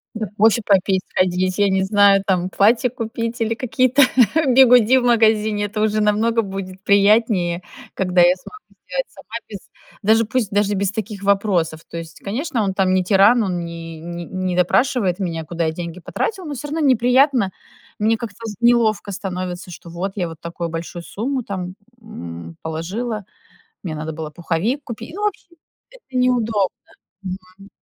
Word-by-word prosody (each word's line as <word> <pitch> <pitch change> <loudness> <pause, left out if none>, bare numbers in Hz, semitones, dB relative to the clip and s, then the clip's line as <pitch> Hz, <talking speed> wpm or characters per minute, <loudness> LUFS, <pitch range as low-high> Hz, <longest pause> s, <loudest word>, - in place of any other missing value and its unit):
Да, 220 -1 -3
кофе 225 +2 +4
попить, 190 -1 +3
сходить, 185 0 0
я 205 -1 +4
не 190 0 +1
знаю, 200 0 +4
там, 185 -1 0
платье 230 +6 +3
купить 230 0 -4
или 225 0 +1
какие-то 255 +3 +2 0.5
бигуди 250 -1 +6
в 255 - +1
магазине. 220 -3 +3
Это 210 +1 -3
уже 215 0 +1
намного 220 +2 +2
будет 190 -2 -7
приятнее, 200 -4 +3 0.3
когда 180 -2 +2
я 175 +1 +6
смогу 425 - -14 0.2
сделать - - -2
сама, 220 +4 -12
без 205 - -7 0.4
даже 220 +2 +4
пусть, 220 -1 -1
даже 205 0 +1
без 200 0 0
таких 205 -1 -5
вопросов. 195 -6 +1
То - - -6
есть, 165 0 -9
конечно, 230 +2 -2
он 195 -2 -1
там 190 -1 +1
не 185 0 +2
тиран, 205 +5 +5
он 180 -3 -2
не 165 -1 -8
не 170 +1 -7
не 185 +1 -3
допрашивает 190 +1 +2
меня, 165 -4 -3
куда 170 +1 -2
я 160 - 0
деньги 170 +2 -6
потратила, 380 - -3
но 300 - -5
всё 285 +2 -6
равно 315 +3 -2
неприятно. 255 -4 +3 0.5
Мне 220 +2 +2
как-то 220 -3 -7
з 215 -2 -5
неловко 230 -4 +3
становится, 185 -2 -5
что 170 +1 -11
вот, 180 +3 -4
я 180 -4 -1
вот 165 -1 -9
такую 170 0 -5
большую 170 +1 -6
сумму 255 +8 -3
там, 185 -3 -5 0.3
м, 85 - -9
положила, 195 +7 -4 0.6
мне 165 -5 -4
надо 155 +1 -5
было 155 0 -6
пуховик 175 - -2
купить. 235 +5 -8
Ну, 415 - -4
в - - +4
общем, 360 -4 -7 0.4
это 285 - -8
неудобно. 225 -6 +2 0.5
Мгм. 185 +1 -9
200 Hz, 170 wpm, -20 LUFS, 180-230 Hz, 0.6 s, бигуди